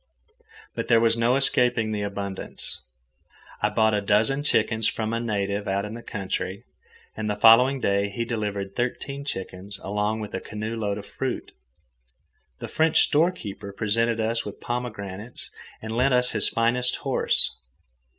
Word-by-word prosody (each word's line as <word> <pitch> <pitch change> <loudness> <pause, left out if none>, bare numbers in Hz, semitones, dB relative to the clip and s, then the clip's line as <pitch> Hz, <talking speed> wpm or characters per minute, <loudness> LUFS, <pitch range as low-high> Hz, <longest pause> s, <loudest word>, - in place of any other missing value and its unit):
But - - -4
there 115 -1 +5
was 115 0 +3
no 115 +2 +2
escaping 125 -4 +2
the 105 -1 -2
abundance. 100 -1 -5 0.8
I 105 - +3
bought 110 0 +2
a 105 - +1
dozen 110 +7 +2
chickens 110 -6 +2
from 110 0 -2
a 115 - 0
native 100 -3 -2
out 100 +1 0
in 105 - -6
the 120 - -7
country, 95 -2 -4 0.5
and 110 -1 -3
the 105 - 0
following 120 +6 +6
day 100 -2 +1
he 115 +4 -3
delivered 105 -4 -3
thirteen 140 +3 -3
chickens 95 -4 -5
along 105 +2 -1
with 105 -1 -6
a - - -3
canoe 110 +1 -5
load 105 -3 -2
of 100 - -7
fruit. 130 -2 -4 1.1
The - - -6
French 160 0 +3
storekeeper 145 - +1
presented 115 +3 +1
us 115 +1 0
with 105 - -8
pomegranates 110 -3 -5 0.3
and 110 0 -4
lent 125 +2 +3
us 125 0 +3
his 110 - +1
finest 125 +2 +2
horse. 135 - +3
110 Hz, 155 wpm, -25 LUFS, 100-120 Hz, 1.1 s, following